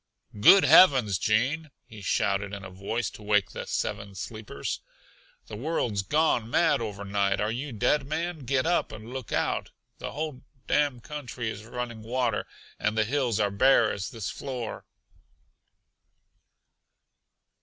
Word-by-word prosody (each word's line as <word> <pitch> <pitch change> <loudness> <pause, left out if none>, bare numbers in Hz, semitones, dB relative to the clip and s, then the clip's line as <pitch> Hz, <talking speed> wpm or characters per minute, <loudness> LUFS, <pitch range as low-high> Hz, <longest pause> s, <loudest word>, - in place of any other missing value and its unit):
"Good 190 - +8
heavens, 130 - +6
Gene!" 135 +9 +1 0.2
he 110 -2 -12
shouted 100 +1 0
in 100 -1 -8
a 95 - -9
voice 100 +5 -3
to - - -12
wake 105 -1 +2
the - - -6
Seven 100 -1 -3
Sleepers. 110 +3 -5 0.7
"The 105 - -8
world's 120 -5 -1
gone 120 - +1
mad 150 0 +3
overnight. 100 -2 -1
Are 105 +1 0
you 135 +5 -4
dead, 125 +5 +1
man? 165 +2 -2
Get 130 0 0
up 175 +1 +1
and 110 +3 -9
look 130 -4 -6
out. - - 0 0.3
The - - -5
whole 150 -2 -4 0.2
damn 145 -5 +1
country 125 -5 -5
is 105 0 -9
running 120 -1 -5
water, 120 -1 -1 0.3
and 105 +1 0
the 110 - +3
hills 125 -3 0
are 100 -1 +2
bare 115 +2 +4
as 95 0 -4
this 115 -4 -5
floor!" 125 -5 -6
115 Hz, 145 wpm, -27 LUFS, 105-135 Hz, 0.7 s, Good